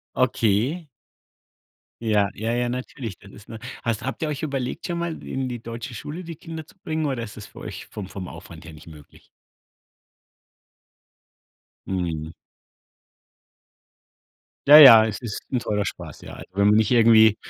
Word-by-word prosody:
Okay. 130 Hz, -, +1 dB, 1.2 s
Ja, 105 Hz, -3 st, +2 dB
ja, 110 Hz, +2 st, -3 dB
ja, 120 Hz, +1 st, 0 dB
natürlich, 125 Hz, -4 st, -6 dB
dann 100 Hz, -, -15 dB
ist 105 Hz, +2 st, -15 dB
'ne 115 Hz, -, -9 dB, 0.2 s
hast 115 Hz, -2 st, -1 dB
habt 130 Hz, +2 st, -4 dB
ihr -, -, 0 dB
euch 150 Hz, -2 st, -4 dB
überlegt, 135 Hz, -5 st, -3 dB
schon 175 Hz, -, -3 dB
mal 170 Hz, -1 st, -4 dB
in 130 Hz, 0 st, -3 dB
die 120 Hz, -2 st, -6 dB
deutsche 115 Hz, +3 st, -7 dB
Schule 150 Hz, +9 st, -7 dB
die 165 Hz, -1 st, -8 dB
Kinder 160 Hz, 0 st, -8 dB
zu -, -, -20 dB
bringen, 160 Hz, -2 st, -2 dB
oder 135 Hz, -4 st, -2 dB
ist 110 Hz, -3 st, -8 dB
das 105 Hz, -, -8 dB
für -, -, -14 dB
euch -, -, -8 dB
vom 100 Hz, -3 st, -6 dB
vom 95 Hz, -1 st, -7 dB
Aufwand 85 Hz, -2 st, -11 dB
her 85 Hz, -, -10 dB
nicht 75 Hz, +1 st, -15 dB
möglich? 75 Hz, -3 st, -15 dB, 2.6 s
Mhm. 85 Hz, -4 st, -3 dB, 2.4 s
Ja, 145 Hz, +2 st, +11 dB
ja, 120 Hz, -7 st, +10 dB
es 105 Hz, -, -4 dB
ist 115 Hz, -4 st, -5 dB
'n 130 Hz, -, +1 dB
teurer 105 Hz, -3 st, -1 dB
Spaß, 80 Hz, -6 st, -7 dB
ja. -, -, -10 dB
Also, -, -, -10 dB
wenn 100 Hz, +1 st, +3 dB
man 105 Hz, -, +5 dB
nicht 110 Hz, +2 st, +2 dB
irgendwie 110 Hz, -3 st, +6 dB
115 Hz, 165 wpm, -23 LUFS, 100-135 Hz, 2.6 s, Ja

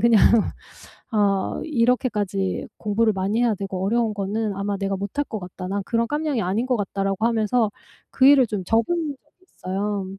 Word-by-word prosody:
그냥 235 Hz, -2 st, +5 dB, 0.9 s
어 200 Hz, -3 st, +1 dB
이렇게까지 230 Hz, -8 st, 0 dB
공부를 215 Hz, +1 st, +1 dB
많이 200 Hz, +5 st, 0 dB
해야 230 Hz, -3 st, +2 dB
되고 190 Hz, -1 st, -4 dB
어려운 230 Hz, +1 st, +1 dB
거는 205 Hz, +1 st, -2 dB
아마 200 Hz, 0 st, -2 dB
내가 195 Hz, 0 st, -1 dB
못할 205 Hz, +9 st, -3 dB
것 220 Hz, -, -5 dB
같다. 185 Hz, 0 st, -8 dB
난 200 Hz, +1 st, -2 dB
그런 230 Hz, 0 st, 0 dB
깜냥이 295 Hz, -3 st, -1 dB
아닌 205 Hz, +7 st, 0 dB
것 250 Hz, -3 st, +1 dB
같다.'라고 195 Hz, +1 st, -1 dB
하면서 225 Hz, -1 st, +1 dB, 0.4 s
그 260 Hz, -, +3 dB
일을 280 Hz, -3 st, +7 dB
좀 205 Hz, -3 st, -3 dB
접은 225 Hz, +3 st, +3 dB, 0.3 s
적이 300 Hz, +7 st, -33 dB
있어요. 195 Hz, +1 st, -2 dB
210 Hz, 340 characters per minute, -23 LUFS, 195-235 Hz, 0.9 s, 일을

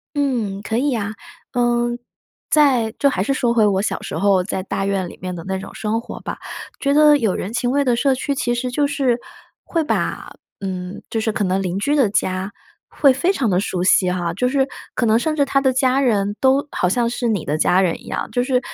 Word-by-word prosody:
嗯， 235 Hz, -9 st, -1 dB
可 225 Hz, +1 st, -2 dB
以 285 Hz, +3 st, +1 dB
呀， 215 Hz, -4 st, -2 dB, 0.4 s
呃， 240 Hz, -1 st, +1 dB, 0.6 s
在 260 Hz, -7 st, +3 dB
就 280 Hz, -, +3 dB
还 190 Hz, -, -1 dB
是 240 Hz, -, 0 dB
说 240 Hz, -3 st, +1 dB
回 220 Hz, -3 st, +4 dB
我 195 Hz, -1 st, +2 dB
小 210 Hz, -, -2 dB
时 -, -, -5 dB
候 195 Hz, -2 st, +3 dB
在 190 Hz, -1 st, -3 dB
大 195 Hz, -, -3 dB
院 195 Hz, -2 st, -1 dB
里 -, -, -12 dB
面 180 Hz, -1 st, -4 dB
的 165 Hz, -, -7 dB
那 190 Hz, 0 st, -1 dB
种 -, -, -9 dB
生 220 Hz, +1 st, -1 dB
活 -, -, -8 dB
吧。 -, -, -6 dB, 0.4 s
觉 280 Hz, 0 st, +1 dB
得 300 Hz, 0 st, +6 dB
有 220 Hz, -8 st, 0 dB
人 205 Hz, +5 st, -4 dB
情 245 Hz, 0 st, 0 dB
味 280 Hz, +2 st, +1 dB
的 245 Hz, -2 st, +3 dB
社 265 Hz, +2 st, +2 dB
区 280 Hz, +2 st, -2 dB
其 240 Hz, -3 st, -1 dB
实 250 Hz, +1 st, -3 dB
就 290 Hz, +2 st, +1 dB
是 270 Hz, -4 st, 0 dB, 0.4 s
会 330 Hz, -2 st, -1 dB
把 300 Hz, -, -2 dB, 0.3 s
嗯， 185 Hz, 0 st, -5 dB
就 225 Hz, -, 0 dB
是 220 Hz, -, 0 dB
可 210 Hz, -, -1 dB
能 190 Hz, +1 st, 0 dB
邻 185 Hz, 0 st, -2 dB
居 290 Hz, +8 st, +1 dB
的 255 Hz, -8 st, +3 dB
家， 190 Hz, -1 st, -1 dB, 0.4 s
会 275 Hz, -3 st, +4 dB
非 345 Hz, +8 st, +1 dB
常 255 Hz, -, 0 dB
地 180 Hz, 0 st, +2 dB
熟 180 Hz, -3 st, -2 dB
悉 185 Hz, 0 st, +4 dB
哈， 175 Hz, -2 st, -2 dB
就 250 Hz, +8 st, 0 dB
是 270 Hz, 0 st, +1 dB, 0.3 s
可 245 Hz, -, +1 dB
能 220 Hz, 0 st, +4 dB
甚 310 Hz, +6 st, 0 dB
至 285 Hz, -2 st, +2 dB
他 275 Hz, 0 st, +1 dB
的 265 Hz, -1 st, +3 dB
家 260 Hz, +1 st, +2 dB
人 205 Hz, -5 st, +1 dB
都 270 Hz, +2 st, +3 dB
好 180 Hz, -, 0 dB
像 235 Hz, +4 st, +1 dB
是 240 Hz, 0 st, -2 dB
你 205 Hz, -7 st, -1 dB
的 150 Hz, -, -1 dB
家 180 Hz, +3 st, +3 dB
人 180 Hz, -3 st, +1 dB
一 -, -, -15 dB
样。 -, -, -3 dB
就 245 Hz, -1 st, +1 dB
是， 255 Hz, -1 st, +1 dB
235 Hz, 255 characters per minute, -20 LUFS, 195-270 Hz, 0.6 s, 得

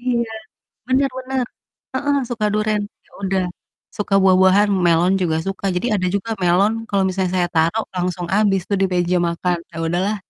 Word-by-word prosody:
Iya, 235 Hz, -2 st, -1 dB, 0.6 s
bener 265 Hz, +1 st, +2 dB
bener, 260 Hz, -1 st, -2 dB, 0.5 s
heeh, 285 Hz, +2 st, 0 dB
suka 225 Hz, -3 st, -1 dB
duren, 215 Hz, 0 st, +1 dB, 0.3 s
ya -, -, -30 dB
udah, 190 Hz, -1 st, 0 dB, 0.5 s
suka 205 Hz, -1 st, -2 dB
buah-buahan, 190 Hz, +2 st, +5 dB, 0.2 s
melon 170 Hz, +3 st, +4 dB
juga 160 Hz, -3 st, +1 dB
suka, 195 Hz, 0 st, -4 dB
jadi 180 Hz, +7 st, -1 dB
ada 185 Hz, -1 st, 0 dB
juga 225 Hz, +3 st, -3 dB
melon, 190 Hz, +5 st, +3 dB, 0.2 s
kalau 195 Hz, -1 st, +2 dB
misalnya 185 Hz, -1 st, -1 dB
saya 175 Hz, -, +2 dB
tarok 165 Hz, +8 st, +2 dB
langsung 180 Hz, 0 st, -2 dB
habis 200 Hz, -3 st, +3 dB
tuh 200 Hz, -, +1 dB
di -, -, +4 dB
meja 180 Hz, 0 st, +1 dB
makan. 175 Hz, +1 st, -1 dB
Ya 165 Hz, -, -10 dB
udahlah, 185 Hz, +6 st, 0 dB
195 Hz, 170 wpm, -20 LUFS, 180-215 Hz, 0.6 s, buah-buahan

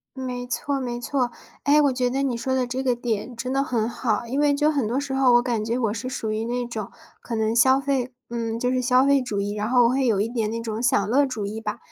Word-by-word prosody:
没 250 Hz, -2 st, -4 dB
错 280 Hz, +3 st, -2 dB
没 240 Hz, -2 st, -4 dB
错。 250 Hz, -1 st, -1 dB, 0.3 s
诶， 290 Hz, +1 st, +5 dB
我 285 Hz, -2 st, +3 dB
觉 250 Hz, -1 st, 0 dB
得 270 Hz, +2 st, -1 dB
你 260 Hz, -4 st, 0 dB
说 260 Hz, +3 st, -2 dB
的 255 Hz, -1 st, +1 dB
这 250 Hz, +2 st, -3 dB
个 255 Hz, -2 st, +2 dB
点 240 Hz, 0 st, -3 dB
真 250 Hz, +2 st, -4 dB
的 275 Hz, +1 st, +2 dB
很 230 Hz, -4 st, 0 dB
好。 235 Hz, -2 st, -1 dB
因 260 Hz, +4 st, -3 dB
为 295 Hz, -1 st, +4 dB
就 295 Hz, +2 st, +2 dB
很 280 Hz, -7 st, 0 dB
多 245 Hz, +5 st, 0 dB
时 280 Hz, -1 st, -4 dB
候， 265 Hz, -2 st, +4 dB
我 240 Hz, -, +6 dB
感 235 Hz, -4 st, -1 dB
觉 230 Hz, +3 st, -1 dB
我 225 Hz, -4 st, 0 dB
是 225 Hz, +2 st, -5 dB
属 230 Hz, -4 st, -3 dB
于 215 Hz, +1 st, -2 dB
那 245 Hz, +1 st, -2 dB
种 220 Hz, -4 st, -5 dB, 0.3 s
可 235 Hz, -, -5 dB
能 220 Hz, 0 st, 0 dB
消 260 Hz, +3 st, +5 dB
费 265 Hz, -2 st, -1 dB, 0.2 s
嗯， 230 Hz, -1 st, -3 dB
就 250 Hz, -, +1 dB
是 255 Hz, 0 st, 0 dB
消 250 Hz, +2 st, +4 dB
费 280 Hz, -1 st, +4 dB
主 210 Hz, -5 st, -2 dB
义， 205 Hz, +1 st, -2 dB
然 210 Hz, +2 st, -2 dB
后 245 Hz, -1 st, +5 dB
我 -, -, +5 dB
会 265 Hz, +1 st, +1 dB
有 215 Hz, -5 st, +2 dB
一 215 Hz, -, 0 dB
点 225 Hz, -3 st, -1 dB
那 230 Hz, +1 st, -3 dB
种 225 Hz, 0 st, -4 dB
享 205 Hz, -5 st, +2 dB
乐 280 Hz, +5 st, +4 dB
主 225 Hz, -7 st, -3 dB
义 220 Hz, +2 st, -5 dB
吧。 210 Hz, -1 st, -4 dB
245 Hz, 295 characters per minute, -24 LUFS, 225-260 Hz, 0.3 s, 我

